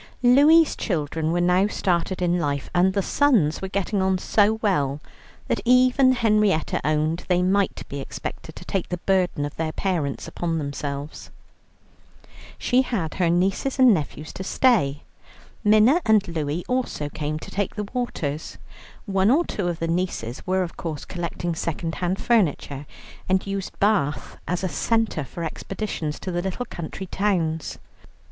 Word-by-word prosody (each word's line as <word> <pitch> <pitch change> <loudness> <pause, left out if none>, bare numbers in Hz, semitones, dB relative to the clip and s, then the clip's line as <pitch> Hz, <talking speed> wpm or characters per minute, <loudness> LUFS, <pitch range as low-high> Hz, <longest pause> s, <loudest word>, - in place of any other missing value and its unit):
Louie's 295 +6 +6
children 160 -3 -2
were 175 - +1
now 180 +3 +3
started 180 -2 -1
in 175 0 +2
life, 145 -3 -2
and 180 +1 +3
the 200 -1 0
sons 215 - +2
were 190 - -3
getting 195 +1 -1
on 190 0 +2
so 205 +3 +3
well 145 -9 +1 0.5
that - - 0
even 255 +1 +5
Henrietta 210 -8 +2
owned 155 +3 0
they 180 -1 +2
might 195 +1 0
be 140 - -5
expected - - -7
to - - -10
take 195 -3 -2
the 180 - -2
burden 180 -5 +1
of 145 - -7
their 160 -1 -1
parents 160 -7 -2
upon 165 -1 -2
themselves. 140 0 -5 1.3
She 250 +1 +2
had 200 -11 -2
her 170 - +3
nieces 190 +10 +1
and 255 -3 +7
nephews 150 -2 -4
to 190 - -6
stay; 185 - +2 0.6
Minna 215 +10 +5
and 215 -3 +3
Louie 160 0 -2
also 250 - -1
came 150 +1 -3
to - - -9
take 200 -1 -2
the 210 -1 -3
waters. 160 - -3 0.5
One 195 -1 +2
or 315 +7 +4
two 195 -4 -3
of 175 -2 -2
the 165 - -2
nieces 165 -9 -3
were 185 0 +2
of 170 - -7
course 155 -4 -5
collecting 175 -1 -3
second 165 0 -3
hand 180 +2 0
furniture, 150 - 0 0.4
and 190 0 +2
used 195 -1 -4
Bath 195 -9 0
as 180 +1 -2
a - - +1
centre 215 +1 0
for 170 +5 -7
expeditions 165 -2 -4
to 185 - -4
the 175 0 -1
little 190 +7 -3
country 175 0 -6
towns. 175 -5 -1
180 Hz, 160 wpm, -24 LUFS, 155-210 Hz, 1.3 s, and